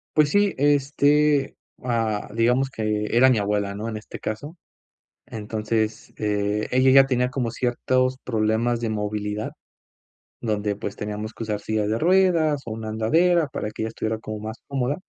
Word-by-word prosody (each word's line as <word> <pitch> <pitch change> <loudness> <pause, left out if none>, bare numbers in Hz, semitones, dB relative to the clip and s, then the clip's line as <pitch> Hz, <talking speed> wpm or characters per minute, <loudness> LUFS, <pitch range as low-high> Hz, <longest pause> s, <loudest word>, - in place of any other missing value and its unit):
Pues 150 -1 +4
sí, 205 -1 +3
este, 145 +1 +3 0.3
ah, 115 -4 -1
digamos 125 +4 +2
que 110 -3 -1
era 130 +2 +6
mi 125 - +3
abuela, 100 -1 -1
¿no? 105 +3 -4
En 115 - -4
este 105 - -9
caso. 145 +11 -5 0.7
Entonces, 110 -1 -3
eh, 105 0 -1
ella 130 +1 +4
ya 135 0 +7
tenía 125 -1 +1
como 125 -2 -2
ciertos 130 +2 0
problemas 115 +1 0
de 115 - -1
movilidad, 105 0 -3 0.9
donde, 105 -3 -1
pues, 100 0 -5
teníamos 105 +1 -5
que - - -7
usar 105 -2 -2
sillas 110 -1 -1
de 110 +1 0
ruedas, 165 -4 +3
o - - -5
una 110 0 -5
andadera 160 +10 +2
para 105 - -4
que 110 - -6
ella 110 - -1
estuviera 110 0 -3
como 110 0 -6
más 110 +2 -6
cómoda. 135 0 -1
115 Hz, 165 wpm, -24 LUFS, 105-135 Hz, 0.9 s, ya